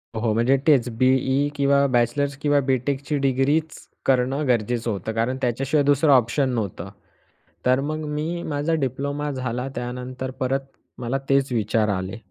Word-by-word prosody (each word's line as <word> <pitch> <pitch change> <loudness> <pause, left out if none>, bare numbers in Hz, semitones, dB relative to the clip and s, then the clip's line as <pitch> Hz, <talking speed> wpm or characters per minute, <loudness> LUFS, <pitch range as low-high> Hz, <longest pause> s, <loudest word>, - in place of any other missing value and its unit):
हो. 110 0 0
म्हणजे 120 +5 +3
तेच 135 -7 +5
बी.ई 130 +2 +2
किंवा 140 0 +3
बॅचलर्स 125 +4 +1
किंवा 145 -1 +3
बी.टेकची 135 +3 0
डिग्रीच, 140 +4 0 0.2
करणं 135 +3 +1
गरजेचं 120 -1 0
होतं 100 +2 -4
कारण 115 +4 -1
त्याच्याशिवाय 135 +4 +1
दुसरं 145 +2 +4
ऑप्शन 130 +2 +2
नव्हतं. 105 -6 -3 0.8
तर 130 +1 +4
मग 155 +2 -3
मी 165 +3 -3
माझा 145 +3 0
डिप्लोमा 140 +3 -2
झाला 125 -1 -3
त्यानंतर 125 +1 -5
परत 135 0 +1 0.4
मला 125 +2 -1
तेच 135 -1 +2
विचार 110 -1 +1
आले. 95 +2 -3
130 Hz, 140 wpm, -23 LUFS, 120-140 Hz, 0.8 s, तेच